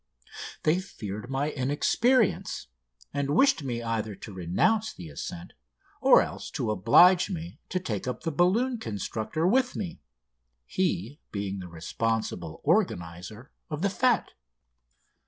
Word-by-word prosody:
They 155 +4 +3
feared 110 - -7
my 140 +3 -1
inexperience, 185 - +1 0.5
and 140 +1 0
wished 275 - +4
me 120 -4 -3
either 110 -2 -2
to 105 - -10
renounce 95 - +1
the 85 -3 -10
ascent 85 +4 -7 0.5
or - - +7
else - - -7
to 110 - 0
oblige 175 - +6
me 170 -2 -6
to 185 - 0
take 110 - -4
up 125 - -4
the 165 - -1
balloon 220 - +2
constructor 110 - -3
with 250 +6 +3
me, 180 -5 -5 0.6
he 140 - -1
being 100 -1 -3
the 90 - -7
responsible 85 0 -3
organiser 90 - -1 0.2
of 155 +2 -4
the 200 - +3
fête. 240 +1 +2
135 Hz, 130 wpm, -28 LUFS, -, 0.6 s, or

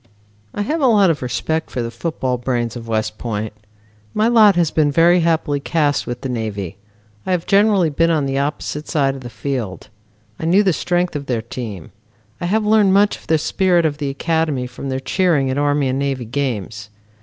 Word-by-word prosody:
I 205 - -1
have 310 +9 -2
a 270 - +4
lot 205 -6 +5
of 155 - -4
respect 160 +6 -2
for 125 - -3
the 115 - -4
football 130 -5 -2
brains 120 -2 -2
of 115 -1 -8
West 110 -1 -2
Point. 110 -2 -3 0.6
My 215 - +3
lot 220 -4 +6
has 170 -3 +2
been 150 -2 +2
very 170 +4 +5
happily 160 -4 +1
cast 145 -1 0
with 120 0 -5
the - - -3
Navy. 105 -6 -4 0.5
I - - -7
have 180 -2 0
generally 200 -5 +3
been 165 +3 +2
on 155 -4 +1
the 135 0 -1
opposite 150 +1 -3
side 140 -3 +1
of 135 - -9
the 120 - -8
field. 115 -4 -4 0.5
I - - -4
knew 190 +5 +4
the 190 -3 +2
strength 175 +1 -1
of 140 -1 -4
their 115 -3 -1
team. 115 -7 -7 0.5
I - - -2
have 215 +3 +1
learned 210 -3 +4
much 205 +1 +4
of - - -20
the 160 - +3
spirit 175 +2 +2
of 150 -1 -1
the 145 -2 -2
academy 150 -2 -1
from 125 +2 -7
their 130 0 -2
cheering 145 -2 +1
at 135 - -1
Army 145 -1 +1
and 130 +1 -1
Navy 135 -3 -2
games. 115 -5 -3
145 Hz, 205 wpm, -19 LUFS, 125-175 Hz, 0.6 s, lot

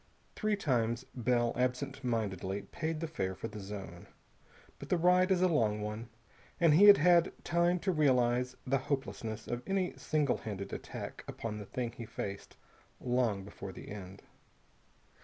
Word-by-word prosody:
Three 215 -1 +1
times 120 - 0
Bell 120 -1 +1
absent 125 +2 -1
mindedly 100 -5 -2
paid 160 - -4
the 165 - -1
fare 95 - -3
for 95 - -5
the 105 +1 -8
zone. 95 -3 -8 0.7
But - - -9
the 180 - +3
ride 180 +2 +4
is 185 -1 +3
a - - +6
long 110 -11 +2
one, 105 +2 -5 0.5
and 165 -3 +5
he 185 +7 +7
had 205 -1 +10
had 170 +2 +5
time 170 +1 +3
to 190 - +1
realize 125 -5 +2
the 135 +1 +2
hopelessness 130 -5 -3
of 120 0 -3
any 195 -2 0
single 150 -3 +1
handed 100 -3 -6
attack - - -6
upon 105 -2 -5
the 105 - -8
thing 120 -2 -3
he 115 -1 -8
faced 100 -1 -6 0.4
long 120 -6 0
before 100 -1 -8
the - - -10
end. 100 -1 -9
125 Hz, 160 wpm, -32 LUFS, 105-160 Hz, 0.7 s, had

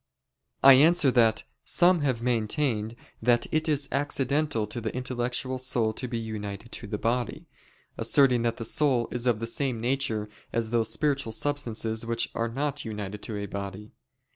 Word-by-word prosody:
I 135 0 +10
answer 150 +1 +6
that, 115 -3 +3 0.2
Some 180 0 +4
have 130 -5 -1
maintained 115 -1 0 0.3
that 120 +1 +3
it 155 +1 0
is 145 -2 +2
accidental 140 -3 0
to 110 +3 -6
the 110 - -3
intellectual 125 +1 -2
soul 120 -4 0
to 125 - -4
be 120 - -3
united 110 -1 -6
to 110 - -5
the 105 - -3
body, 120 +3 -2 0.5
asserting 130 -4 +4
that 115 0 -1
the 115 - -4
soul 130 -2 +2
is 125 0 -1
of 115 -3 +2
the 115 - -3
same 125 0 0
nature 120 -3 -1 0.2
as 115 -1 -1
those 115 -2 +1
spiritual 140 -6 0
substances 115 -6 -2
which 115 0 -2
are 115 0 -1
not 145 +3 -2
united 105 -2 -6
to 110 -3 -5
a 100 - -3
body. 100 +1 -7
120 Hz, 165 wpm, -27 LUFS, 110-135 Hz, 0.5 s, I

